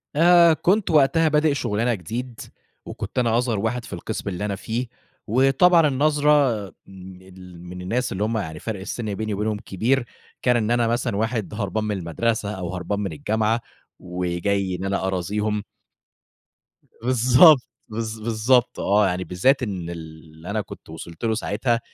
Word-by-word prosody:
آآ 170 +1 +6
كنت 185 +4 +1
وقتها 155 +2 +4
بادئ 150 0 +3
شُغلانة 120 -2 0
جديد 115 +6 -6 0.5
وكنت 105 +4 -5
أنا 115 -2 +2
أصغر 120 -4 0
واحد 115 +3 -2
في - - -10
القِسم 100 +4 -4
اللي 100 +2 -4
أنا 100 -2 -2
فيه 115 +5 -3 0.4
وطبعًا 135 - +4
النظرة 145 -5 +2
م - - -19 0.5
ال 90 -2 -13
من 90 +1 -8
الناس 120 +8 -1
اللي 95 +2 -2
هم 110 +1 0
يعني 80 -7 -4
فَرْق 110 +1 -5
السِن 105 +2 -4
بيني 110 +1 -3
وبينهم 105 +1 -1
كبير، 120 +7 0 0.4
كان 125 -1 +3
إن 110 -1 0
أنا 120 -1 +2
مثلًا 120 -2 -1
واحد 110 -1 -2
هربان 105 +1 -2
من 105 -2 -2
المدرسة 105 +5 -1
أو 95 -3 -5
هربان 95 +3 -3
من 100 -3 -3
الجامعة 110 +8 0 0.4
وجاي 90 +2 -2
إن 90 +2 -5
أنا 95 -1 -1
أرازيهم. 105 +3 -1 1.4
بالضبط. 130 +6 +6 0.3
بالض 110 0 -4
بالضبط 115 +3 +1
آه. 100 +1 +3
يعني 90 0 -2
بالذات 125 +10 +2
إن 95 -7 -4
اللي 80 0 -10
أنا 105 +1 -1
كنت 100 - -12
وصلت 80 +3 -10
له 110 - +2
ساعتها، 115 +2 0
110 Hz, 160 wpm, -23 LUFS, 95-125 Hz, 1.4 s, آآ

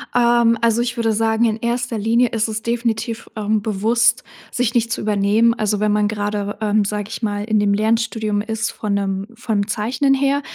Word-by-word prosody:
Ähm, 235 -1 +4
also, 230 0 +2
ich 240 0 -2
würde 225 -1 +1
sagen, 225 +1 +1
in 220 -1 0
erster 235 0 -2
Linie 230 +3 +2
ist 225 -1 -1
es 220 0 -4
definitiv, 230 -1 -2
ähm, 215 0 0
bewusst, 230 +4 +1 0.3
sich 245 -2 0
nicht 235 -1 +1
zu - - -2
übernehmen. 210 +2 +2
Also, 215 -3 -1
wenn 210 0 +1
man 210 0 +2
gerade, 205 -1 -3
ähm, 210 -1 +2
sage 205 0 -3
ich - - -6
mal, 205 -2 -2
in 215 -1 +1
dem 205 -1 +2
Lernstudium 220 0 0
ist 220 +1 -3
von 210 -2 -3
'nem 195 0 -2
vom 215 -3 -1
Zeichnen 240 +6 0
her, 275 +1 +1
220 Hz, 195 wpm, -19 LUFS, 210-235 Hz, 0.3 s, Ähm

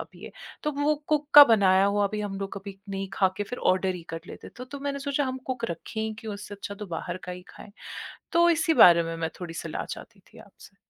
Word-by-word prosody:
अब - - -7
ये? - - -11 0.3
तो 300 - 0
वो 300 +1 +3
कुक 300 -1 +1
का 290 - +13
बनाया 195 -5 +4
हुआ 205 0 +2
भी 210 - -2
हम 195 -1 -4
लोग 195 - -5
कभी 195 0 -10
नहीं 195 0 -4
खा 190 - +3
के 205 - 0
फिर 250 +4 -7
ऑर्डर 185 0 -1
ही 170 - -9
कर 165 - -5
लेते - - -10
थे। - - -20
तो 250 - -7
तो 280 +2 -9
मैंने 280 0 -3
सोचा 285 0 -1
हम 260 0 -3
कुक 250 -3 -3
रखें 170 +6 -6
ही 220 0 -2
क्यों? 215 -2 -6
उससे 205 0 -8
अच्छा 200 0 -7
तो 210 0 -8
बाहर 175 +2 -5
का 180 - -5
ही 180 0 -9
खाएँ, 200 - -13 0.6
तो 340 0 +5
इसी 325 0 +2
बारे 170 -1 +6
में 165 0 -4
मैं 165 -1 -2
थोड़ी 170 -2 -6
सलाह - - -5
चाहती - - -9
थी - - -16
आपसे। - - -17
205 Hz, 260 wpm, -26 LUFS, 190-265 Hz, 0.6 s, का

